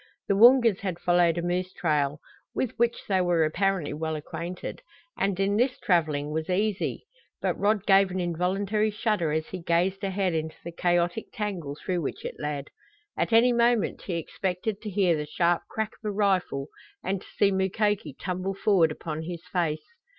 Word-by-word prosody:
The 200 - +2
Woongas 235 -1 +6
had 185 -4 -3
followed 175 -1 +3
a 170 - -1
moose 180 +1 -1
trail, 150 -3 0 0.4
with 255 - 0
which 235 0 +1
they 190 -2 +2
were 175 -2 +3
apparently 180 -1 0
well 160 +1 -2
acquainted, 170 - -6 0.3
and 195 -1 -1
in 200 +1 +2
this 250 +2 +2
traveling 155 -5 +1
was 160 +2 -3
easy. 205 +2 -1 0.3
But - - 0
Rod 205 0 +2
gave 195 -1 +5
an 185 +1 -3
involuntary 190 +5 0
shudder 210 -6 0
as 155 +1 0
he 185 - -5
gazed 180 +4 +1
ahead 190 -2 0
into 160 0 -2
the 170 - -6
chaotic 175 +3 0
tangle 185 -9 -4
through 175 +3 -2
which 140 - -5
it - - -5
led. 145 -1 -4 0.4
At - - -1
any 235 +2 +5
moment 235 -2 +2
he 180 - -4
expected 185 +5 -3
to 215 - -5
hear 190 -4 +2
the 150 -1 -4
sharp 170 +2 +1
crack 220 -1 -2
of - - -17
a - - -1
rifle 185 -9 0 0.3
and 190 0 -1
to - - -15
see 200 -1 +4
Mukoki 195 -3 0
tumble 185 +1 -3
forward 190 -6 +3
upon 155 0 -5
his 170 0 -6
face. 165 -4 0
185 Hz, 180 wpm, -27 LUFS, 165-200 Hz, 0.4 s, Woongas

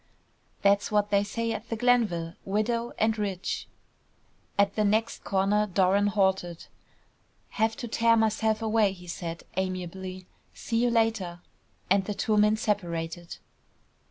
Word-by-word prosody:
"That's 200 +1 +3
what 210 -1 +1
they 200 0 +4
say 230 +3 -2
at 225 +1 -5
the 230 - -1
Glenville. 215 -9 +1
Widow 230 +4 -1
and 220 0 +2
rich." 195 -3 -3 0.9
At 200 -1 +3
the 215 - +1
next 220 +2 0
corner 200 +2 +1
Doran 195 +1 +3
halted. 190 -4 0 0.8
"Have 220 0 0
to 245 - -5
tear 230 0 +3
myself 220 0 +1
away," 215 -3 +2
he 180 -2 -13
said, 170 -1 -6
amiably. 185 0 -4 0.3
"See 230 -1 -1
you 245 - +3
later," 220 -7 0 0.5
and 195 0 +3
the 210 - -3
two 215 - 0
men 210 +1 +4
separated. 175 -5 -3
205 Hz, 135 wpm, -27 LUFS, 185-220 Hz, 0.9 s, they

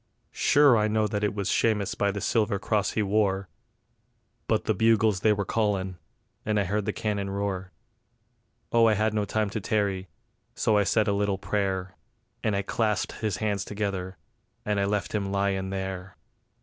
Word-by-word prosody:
Sure 145 -3 +5
I 105 0 +2
know 110 0 +1
that 105 0 -2
it 105 -1 0
was 100 -2 -2
Shamus 105 -4 +1
by 100 - 0
the 100 0 -3
silver 105 -2 +1
cross 105 -1 0
he 110 - +1
wore; 100 -1 +1 1.0
But - - +1
the 110 - +2
bugles 110 -1 +3
they 110 +2 +3
were 100 -1 0
callin', 95 -4 -1 0.4
and 105 -1 +1
I - - +2
heard 100 +2 -1
the - - 0
cannon 105 -3 -2
roar. 95 -2 -3 1.0
Oh 115 -1 +5
I 110 - +4
had 110 +1 +1
no 105 -1 0
time 105 -1 -1
to 110 - -3
tarry, 100 -3 -1 0.5
so 110 - +2
I 105 -1 +3
said 110 +2 +2
a 100 - +2
little 100 -1 0
prayer, 95 -1 -2 0.5
And 110 -3 +1
I 100 - 0
clasped 105 -1 0
his 105 -4 -1
hands 105 -2 -1
together, 100 -3 -4 0.5
and 105 -1 0
I 100 - +2
left 105 0 -1
him 100 -2 -1
lyin' 100 -1 0
there. 95 -1 -5
100 Hz, 180 wpm, -27 LUFS, 95-110 Hz, 1.0 s, Sure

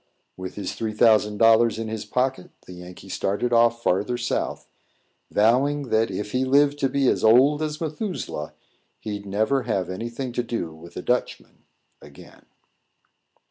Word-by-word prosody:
With 95 0 -7
his 100 -2 -4
three 110 -1 -4
thousand 105 -1 +3
dollars 115 +1 +4
in 115 0 -4
his 110 -1 -5
pocket, 130 -6 -1 0.2
the 90 - -11
Yankee 90 +2 -11
started 105 +5 -2
off 115 0 +3
farther 105 +7 0
South, 120 0 -3 0.6
vowing 130 +6 +2
that, 110 +1 +2
if 105 +2 -5
he 130 +3 0
lived 145 +2 +3
to 135 - +1
be 135 0 +1
as - - +1
old 130 +7 +5
as 155 -1 -3
Methuselah, 160 - -5 0.4
he'd 105 -2 -6
never 110 +7 +1
have 95 -6 -2
any 115 +6 -5
thing 125 +2 -5
to 120 - -1
do 115 -9 -4
with 85 +2 -13
a - - -5
Dutchman 125 0 -3 0.4
again. - - -16
115 Hz, 160 wpm, -24 LUFS, 105-130 Hz, 0.6 s, old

